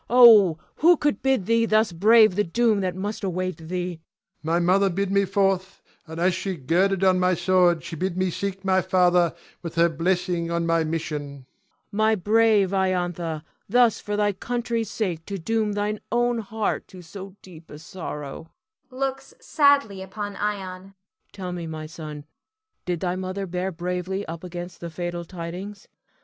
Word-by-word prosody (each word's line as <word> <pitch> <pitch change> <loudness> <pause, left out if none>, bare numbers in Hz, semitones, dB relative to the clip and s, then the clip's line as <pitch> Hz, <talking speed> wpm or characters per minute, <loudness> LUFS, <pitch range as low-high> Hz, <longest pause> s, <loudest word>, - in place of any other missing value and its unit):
Oh, 220 -9 +8 0.2
who 340 +2 +5
could 295 -1 0
bid 265 -8 +1
thee 230 +1 +2
thus 215 -1 +3
brave 215 +4 +5
the 210 - +2
doom 220 +3 +2
that 185 -2 -2
must 205 +3 -4
await 185 -1 -2
thee? 180 -1 -3
Ion. - - -39 0.4
My 165 +2 0
mother 190 +3 +3
bid 195 +2 -2
me 200 0 +3
forth; 195 -1 0 0.2
and 160 +1 -7
as 180 +2 +3
she 185 +1 -3
girded 180 +7 +1
on 185 -1 +4
my 180 0 +2
sword, 175 -2 +3
she 170 - -6
bid 185 +2 -2
me 185 -1 +1
seek 195 +1 -4
my 190 -1 +3
father, 180 -2 +3 0.3
with 170 -1 -7
her 170 +1 +4
blessing 175 +1 -1
on 170 0 -1
my 165 -1 +2
mission. 155 -1 -3
Cleon. 140 -2 -11 0.5
My 215 +1 +2
brave 210 -1 +3
Iantha, 175 -4 -1 0.3
thus 240 0 +4
for 205 0 -4
thy 205 0 +2
country's 235 +2 -3
sake 175 -7 -3
to 200 - -4
doom 215 +3 -1
thine 205 +1 -2
own 240 0 +1
heart 220 0 -3
to 185 -1 -12
so 190 +3 -10
deep 170 -3 -14
a 150 - -9
sorrow 155 -2 -7 0.4
[looks 270 - -4
sadly 280 - +2
upon 205 +2 -6
Ion]. 195 -2 -4 0.4
Tell 185 -3 -6
me, 175 -2 -5
my 155 -1 -6
son, 155 -2 -8 0.6
did 175 -2 -2
thy 180 -1 -1
mother 185 +1 -4
bear 180 +1 -3
bravely 180 +3 -3
up 165 +1 -7
against 175 0 -7
the 170 - -6
fatal 175 +1 -4
tidings? 185 +4 -7
185 Hz, 170 wpm, -24 LUFS, 170-205 Hz, 0.6 s, Oh